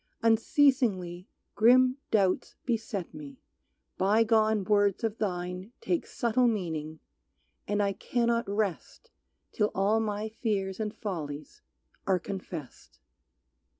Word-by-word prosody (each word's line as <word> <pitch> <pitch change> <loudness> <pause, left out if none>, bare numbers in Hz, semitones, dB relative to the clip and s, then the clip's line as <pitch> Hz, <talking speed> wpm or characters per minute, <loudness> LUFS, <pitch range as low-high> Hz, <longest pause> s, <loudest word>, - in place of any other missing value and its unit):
Unceasingly 225 -6 +2 0.3
Grim 255 +4 +5
doubts 195 -4 +1
beset 225 -6 -3
me, 280 -3 -10 0.6
bygone 220 +1 +3
words 205 +1 +2
of 225 -1 -2
thine 180 +1 -3
Take 345 - -1
subtle 245 +1 +1
meaning, 160 -8 -2 0.7
and 205 0 +1
I 200 -1 +1
cannot 235 +2 0
rest 205 - -3 0.4
Till 210 -1 +1
all 205 +3 +2
my 215 -1 -2
fears 205 -4 -2
and 215 -1 -2
follies 175 - -6 0.5
are 190 -1 +3
confessed. 180 -6 -8
210 Hz, 105 wpm, -29 LUFS, 190-230 Hz, 0.7 s, Grim